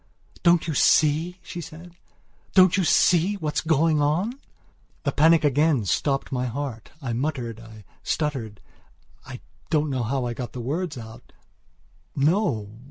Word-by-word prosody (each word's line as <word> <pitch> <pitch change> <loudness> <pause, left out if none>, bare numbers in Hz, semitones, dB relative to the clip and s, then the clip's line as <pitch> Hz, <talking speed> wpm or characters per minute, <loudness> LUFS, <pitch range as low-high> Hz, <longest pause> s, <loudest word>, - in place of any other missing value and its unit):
"Don't 170 -1 +4
you 160 - -1
see?" 155 +5 +3
she 175 - -7
said, 165 +2 -11 0.6
"don't 185 -2 +6
you 190 - +1
see 175 +3 +3
what's 155 -5 -2
going 160 -1 +2
on?" 170 +11 +1 0.7
The 140 - 0
panic 160 +3 +4
again 145 -4 +2
stopped 135 +8 -1
my 125 -1 -1
heart. 125 -3 -5
I 120 -3 -2
muttered, 120 -3 -3
I 110 -2 -13 0.2
stutteredI 125 -9 -3 1.1
don't 155 -2 +1
know 130 -2 -1
how 125 +2 -1
I 120 - -2
got 120 0 -6
the 125 - -6
words 150 +5 -3
out: 115 -1 -11 0.8
"No! 135 - 0
145 Hz, 140 wpm, -24 LUFS, 120-165 Hz, 1.1 s, don't